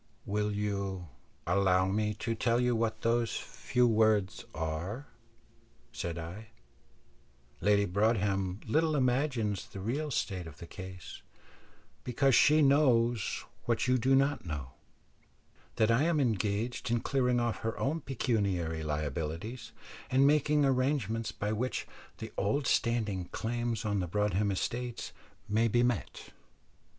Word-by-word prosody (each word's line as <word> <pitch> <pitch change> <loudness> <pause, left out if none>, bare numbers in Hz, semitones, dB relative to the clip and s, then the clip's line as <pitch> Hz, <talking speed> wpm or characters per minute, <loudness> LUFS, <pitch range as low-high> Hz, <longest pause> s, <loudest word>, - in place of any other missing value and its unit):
"Will 105 +1 0
you 100 -4 -3 0.4
allow 95 0 +3
me 105 +2 0
to 115 +2 -2
tell 115 +1 +1
you 125 -1 +2
what 110 -1 -1
those 115 0 +1
few 125 0 0
words 110 -3 +2
are?" 80 - -4 0.9
said 85 -1 -4
I. 90 +7 -7 1.1
"Lady 100 0 +3
Broadhem 100 -1 0
little 155 +6 +2
imagines 125 -6 0
the 100 - -9
real 135 +10 -2
state 95 - -2
of 75 -3 -11
the 85 - -9
case, 95 -1 -9 0.8
because 135 +2 +2
she 150 +5 +6
knows 120 -6 +3 0.2
what 115 0 +1
you 125 0 +3
do 130 +3 +3
not 140 +2 +2
know, 75 -7 -5 1.0
that 110 +1 +3
I 115 +3 +3
am 165 -2 +2
engaged 110 0 -1
in 120 -1 +1
clearing 125 -3 +1
off 120 -1 0
her 115 0 -3
own 155 +5 -1
pecuniary 100 - -1
liabilities, 80 - -4 0.4
and 135 +2 +4
making 150 0 +3
arrangements 130 -5 0
by 105 +1 -3
which 125 +4 -2 0.3
the - - -8
old 130 +8 0
standing 110 -8 +1
claims 115 +2 -3
on 105 -1 0
the 90 - -2
Broadhem 105 +2 +1
estates 120 +5 -3 0.4
may 110 +2 +2
be 120 +2 +2
met. 120 -5 -2
110 Hz, 130 wpm, -31 LUFS, 95-125 Hz, 1.1 s, she